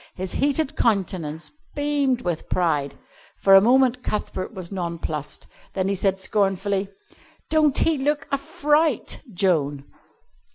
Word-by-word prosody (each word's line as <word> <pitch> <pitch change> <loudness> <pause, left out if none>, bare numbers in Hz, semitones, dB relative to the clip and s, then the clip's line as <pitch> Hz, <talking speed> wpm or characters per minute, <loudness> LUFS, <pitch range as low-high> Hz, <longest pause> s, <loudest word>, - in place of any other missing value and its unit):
His 185 0 -4
heated 285 +1 0
countenance 180 -8 -1 0.2
beamed 285 -4 +1
with 175 -6 -3
pride. 150 -6 0 0.4
For 195 - +4
a 195 - +9
moment 255 +2 +3
Cuthbert 210 -4 -3
was 185 -5 -8
nonplussed. 170 -5 -4 0.3
Then 190 -1 0
he - - +1
said 195 0 0
scornfully: 195 0 0 0.6
"Don't 305 -3 +3
he 320 -3 +3
look 295 +2 0
a 275 - +2
fright, 295 +2 0
Joan?" 155 -7 0
195 Hz, 125 wpm, -23 LUFS, 175-270 Hz, 0.6 s, a